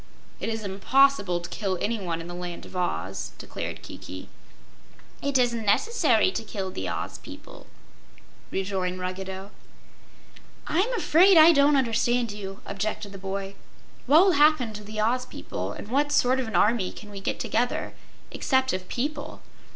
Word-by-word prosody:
"It -, -, -3 dB
is 225 Hz, -1 st, -3 dB
impossible 200 Hz, -1 st, +2 dB
to 175 Hz, -, -8 dB
kill 195 Hz, -2 st, -2 dB
anyone 190 Hz, -7 st, -2 dB
in 165 Hz, -, -8 dB
the 175 Hz, -, -7 dB
Land 175 Hz, -1 st, -6 dB
of -, -, -13 dB
Oz," 180 Hz, -1 st, -3 dB
declared -, -, -6 dB
Kiki. -, -, -9 dB, 0.9 s
"It 280 Hz, -1 st, +1 dB
isn't 240 Hz, -2 st, +1 dB
necessary 235 Hz, -, +3 dB
to 225 Hz, -, -4 dB
kill 195 Hz, -3 st, -5 dB
the 95 Hz, -, -4 dB
Oz -, -, -4 dB
people," -, -, -12 dB, 0.8 s
rejoined 185 Hz, -1 st, -2 dB
Ruggedo. 190 Hz, +2 st, -5 dB, 1.1 s
"I'm 385 Hz, +9 st, +1 dB
afraid 370 Hz, -2 st, +5 dB
I 320 Hz, +1 st, +9 dB
don't 285 Hz, -1 st, +5 dB
understand 240 Hz, -1 st, +1 dB
you," 195 Hz, -1 st, -7 dB
objected 205 Hz, +1 st, -3 dB
the 195 Hz, -, -9 dB
boy. 195 Hz, 0 st, -4 dB, 0.5 s
"What 310 Hz, +8 st, +7 dB
will 390 Hz, -, +5 dB
happen 295 Hz, -7 st, +4 dB
to 210 Hz, 0 st, -8 dB
the 215 Hz, +1 st, -6 dB
Oz 245 Hz, +4 st, +1 dB
people, -, -, -5 dB
and -, -, -9 dB
what 290 Hz, +4 st, +1 dB
sort 260 Hz, -2 st, +3 dB
of 255 Hz, -, -2 dB
an 220 Hz, -, -5 dB
army 205 Hz, 0 st, +3 dB
could 210 Hz, -1 st, -12 dB
we 200 Hz, -, -7 dB
get -, -, -2 dB
together, 245 Hz, +2 st, -1 dB, 0.4 s
except 260 Hz, -1 st, +1 dB
of 185 Hz, 0 st, -4 dB
people?" 290 Hz, +4 st, -4 dB
215 Hz, 160 wpm, -26 LUFS, 195-265 Hz, 1.1 s, I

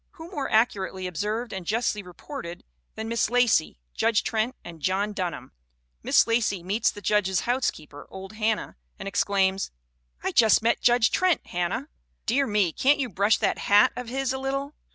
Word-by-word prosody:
Who 340 Hz, -1 st, -11 dB
more 285 Hz, -7 st, -3 dB
ac 220 Hz, +2 st, +5 dB
curately 190 Hz, -1 st, -4 dB
observed 210 Hz, +7 st, -3 dB
and 190 Hz, -2 st, -5 dB
justly 215 Hz, +2 st, -1 dB
reported 180 Hz, -, -9 dB, 0.3 s
than 220 Hz, -, -5 dB
Miss 230 Hz, -2 st, 0 dB
Lacey, 240 Hz, -9 st, +2 dB, 0.2 s
Judge 225 Hz, -, +2 dB
Trent 225 Hz, +3 st, -1 dB
and 170 Hz, -2 st, -10 dB
John 195 Hz, +5 st, 0 dB
Dunham? 175 Hz, -10 st, -4 dB, 0.5 s
Miss -, -, +4 dB
Lacey 225 Hz, -6 st, 0 dB
meets 200 Hz, +6 st, +1 dB
the 205 Hz, -, -9 dB
judge's 190 Hz, -1 st, +2 dB
housekeeper, 235 Hz, -, -3 dB
old 190 Hz, +1 st, -9 dB
Hannah, 215 Hz, -, -1 dB, 0.2 s
and -, -, -7 dB
ex 195 Hz, -, +1 dB
claims: 195 Hz, -1 st, +1 dB, 0.3 s
" -, -, -35 dB
'I -, -, 0 dB
just 220 Hz, -1 st, +5 dB
met 230 Hz, -, +2 dB
Judge 240 Hz, -2 st, +4 dB
Trent, 370 Hz, -3 st, +2 dB
Hannah. 175 Hz, -1 st, -2 dB, 0.4 s
Dear 275 Hz, +3 st, +2 dB
me, 205 Hz, -5 st, +2 dB
can't 285 Hz, +3 st, +3 dB
you 265 Hz, -3 st, -2 dB
brush 200 Hz, +3 st, +2 dB
that 205 Hz, -, 0 dB
hat 205 Hz, +1 st, +4 dB
of 250 Hz, -2 st, -6 dB
his 265 Hz, +1 st, -1 dB
a 265 Hz, -, -3 dB
little? 275 Hz, +2 st, -3 dB
215 Hz, 180 wpm, -26 LUFS, 190-245 Hz, 0.5 s, ac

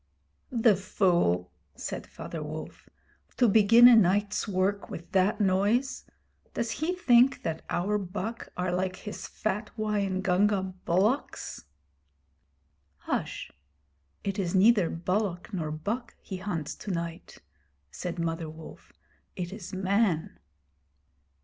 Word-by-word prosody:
'The 230 Hz, -4 st, +4 dB
fool!' 175 Hz, -, +1 dB, 0.2 s
said -, -, -5 dB
Father 165 Hz, -, -7 dB
Wolf. 155 Hz, +1 st, -8 dB, 0.5 s
'To 245 Hz, -, +5 dB
begin 225 Hz, +3 st, +7 dB
a 245 Hz, -, +9 dB
night's 205 Hz, 0 st, +2 dB
work 200 Hz, +1 st, 0 dB
with 170 Hz, +1 st, -8 dB
that 190 Hz, +2 st, +2 dB
noise. 205 Hz, +7 st, +1 dB, 0.5 s
Does 230 Hz, -1 st, -1 dB
he 315 Hz, +9 st, -1 dB
think 260 Hz, -6 st, +4 dB
that 160 Hz, -1 st, -3 dB
our 205 Hz, +4 st, 0 dB
buck 205 Hz, +4 st, -5 dB
are 180 Hz, 0 st, 0 dB
like 185 Hz, +1 st, -1 dB
his 205 Hz, +3 st, -7 dB
fat 210 Hz, +1 st, -3 dB
Waingunga 195 Hz, -2 st, +1 dB
bullocks?' 205 Hz, +11 st, 0 dB, 1.4 s
'H'sh. -, -, -3 dB, 0.7 s
It 195 Hz, 0 st, -2 dB
is 180 Hz, -1 st, -1 dB
neither 200 Hz, -2 st, +5 dB
bullock 180 Hz, +3 st, -2 dB
nor 165 Hz, -5 st, -2 dB
buck 205 Hz, +11 st, -4 dB
he 190 Hz, -, -7 dB
hunts 180 Hz, -6 st, -3 dB
to -, -, -8 dB
night,' 170 Hz, -2 st, -4 dB, 0.5 s
said 180 Hz, -, -5 dB
Mother 165 Hz, -1 st, -2 dB
Wolf. 160 Hz, 0 st, -12 dB, 0.4 s
'It 180 Hz, +1 st, -4 dB
is 200 Hz, -4 st, -8 dB
Man.' 190 Hz, -3 st, 0 dB
190 Hz, 120 wpm, -28 LUFS, 175-215 Hz, 1.4 s, a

